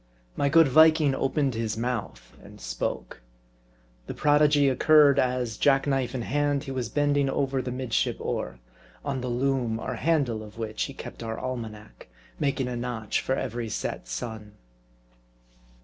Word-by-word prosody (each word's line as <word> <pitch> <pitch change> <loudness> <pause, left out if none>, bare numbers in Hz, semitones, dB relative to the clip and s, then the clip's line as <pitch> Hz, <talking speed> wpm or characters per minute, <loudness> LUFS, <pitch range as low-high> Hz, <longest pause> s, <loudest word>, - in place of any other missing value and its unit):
My 140 - +1
good 165 +1 +6
Viking 155 0 +5
opened 135 0 0
his 110 -1 -2
mouth, 115 - -4
and - - -14
spoke. - - -4 0.9
The - - -5
prodigy 145 -1 +4
occurred, 140 +1 +5
as, 125 -3 0
jacknife 135 -2 +2
in 120 - -2
hand, 145 +1 0
he 135 - -6
was 125 -4 -3
bending 145 0 +1
over 135 -1 0
the 125 - -5
midship 125 -2 -1
oar; - - -3 0.5
on 135 -3 -2
the 125 - -3
loom, 120 -2 0
or - - -4
handle, 140 -9 +1
of 105 0 -12
which 110 -1 -3
he - - -9
kept - - -9
our 115 -1 -4
almanac; 110 -4 -7 0.3
making 135 -2 0
a 125 - -3
notch 120 -3 -2
for 130 - -1
every 120 -3 -3
set - - -4
sun. 105 - -6
130 Hz, 150 wpm, -26 LUFS, 115-140 Hz, 0.9 s, good